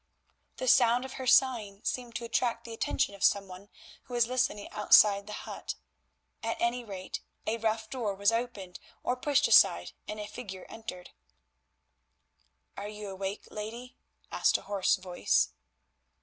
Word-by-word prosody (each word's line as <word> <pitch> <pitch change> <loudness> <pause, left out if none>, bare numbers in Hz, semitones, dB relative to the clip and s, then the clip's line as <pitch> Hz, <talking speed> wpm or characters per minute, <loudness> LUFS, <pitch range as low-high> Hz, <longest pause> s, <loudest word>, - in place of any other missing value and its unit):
The 255 - -3
sound 245 0 +5
of 265 - -8
her 260 - -4
sighing 230 -6 +3
seemed 245 -3 -3
to 235 +2 -3
attract 230 0 0
the 230 - -8
attention 225 - 0
of 200 - -7
some 200 -1 +3
one 185 +2 -11 0.4
who 245 - -7
was 240 -1 +4
listening 250 -4 -1
outside 205 -1 +5
the - - -7
hut; - - -6 0.7
at 230 0 -3
any 240 +1 0
rate 195 -4 -6 0.2
a 230 +1 -1
rough 220 0 -1
door 220 -4 -3
was 200 +2 +3
opened 230 -6 -4 0.2
or 250 - 0
pushed 280 +3 +2
aside - - +5 0.2
and 215 - -5
a 210 - -4
figure 200 -4 -8
entered. 180 -5 -8 1.6
"Are 205 +1 -6
you 210 -1 -7
awake, 195 +1 -5
lady?" 230 +4 -7 0.4
asked - - +3
a - - -13
hoarse 200 -2 +2
voice. 185 -2 +1
220 Hz, 155 wpm, -30 LUFS, 200-240 Hz, 1.6 s, sound